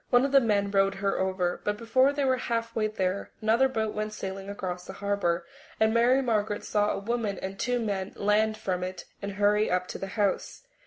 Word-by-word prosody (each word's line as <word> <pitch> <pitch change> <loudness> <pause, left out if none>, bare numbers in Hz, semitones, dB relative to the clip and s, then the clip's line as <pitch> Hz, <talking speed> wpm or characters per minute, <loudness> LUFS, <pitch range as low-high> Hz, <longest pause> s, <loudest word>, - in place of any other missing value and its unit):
One 245 +1 +5
of 275 - -1
the 275 -1 +6
men 200 -4 +1
rowed 195 0 +3
her 195 0 -1
over, 185 -2 -1
but 210 0 -1
before 255 +5 +3
they 285 -1 -1
were 260 -1 +3
halfway 230 -2 -1
there 195 -2 -2
another 230 +5 +3
boat 220 -4 -1
went 215 0 -3
sailing 195 -1 -6
across 180 -3 -5
the 190 - -7
harbour, 200 -4 -1 0.3
and 220 0 +3
Mary 245 +3 +4
Margaret 215 -3 0
saw 210 0 +1
a - - -1
woman 215 -1 -2
and 190 +1 -6
two 245 0 +1
men 200 -4 -2
land 215 +1 +2
from 180 -3 -2
it 185 0 -5 0.2
and 200 0 -4
hurry 205 +1 +2
up 180 0 +1
to - - -5
the 195 - -4
house. 205 - -1
210 Hz, 210 wpm, -28 LUFS, 195-230 Hz, 0.3 s, the